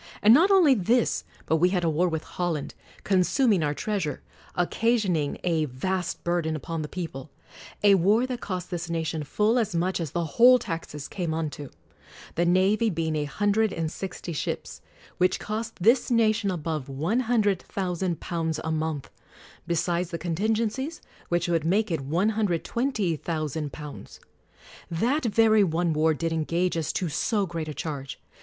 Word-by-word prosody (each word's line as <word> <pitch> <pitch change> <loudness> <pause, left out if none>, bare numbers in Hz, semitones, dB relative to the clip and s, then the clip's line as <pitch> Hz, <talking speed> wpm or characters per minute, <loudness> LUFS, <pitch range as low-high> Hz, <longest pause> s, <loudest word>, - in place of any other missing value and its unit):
And 215 +2 +8
not 335 +9 +6
only 365 -8 +6
this, 235 +2 +1 0.2
but 160 - +2
we 180 +3 +4
had 180 -2 0
a 165 - +2
war 175 +4 +2
with 160 -1 -3
Holland; 170 -5 -3 0.3
consuming 195 - +3
our 150 -1 0
treas 205 +1 -1
ure; 150 - -4 0.3
occasioning 180 -5 +1
a 165 -3 +1
vast 175 +7 -3
burden 170 -2 0
upon 160 +2 -4
the 150 - -4
people. 155 -6 -6 0.5
A 205 -1 +7
war 200 +6 +4
that 250 -2 -5
cost 185 -2 -4
this 175 -1 -4
nation 160 -2 -2
full 215 - +2
as 215 -6 -1
much 180 +3 0
as 165 -3 -3
the 170 +4 -2
whole 245 - +6
taxes 165 - -5
came 170 -5 -3
unto; 150 -3 -4 0.6
the 175 +1 +1
navy 195 +6 +3
being 160 -3 -1
a 150 -1 0
hundred 205 +7 +1
and 160 -1 -2
sixty 185 -2 -6
ships, 150 - -4 0.4
which 185 - +2
cost 220 +2 -4
this 230 +8 +3
nation' 220 -3 +2
above 155 -5 -3
£100,000 180 - -1
a 160 - -2
month; 155 -3 -2 0.6
besides 170 +1 0
the 170 - -4
contingencies, 220 - -1 0.3
which 175 0 +1
would 165 -3 +1
make 195 +5 +1
it 140 -4 -3
£120,000. 170 - -2 0.7
That 245 - 0
very 220 -1 +4
one 170 -1 +1
war 155 +1 +2
did 165 +1 -2
engage 170 +3 0
us 165 -1 -1
to 180 - -1
so 200 +6 0
great 165 -3 -4
a 155 - -4
charge. 140 -4 -5
175 Hz, 155 wpm, -26 LUFS, 160-210 Hz, 0.7 s, And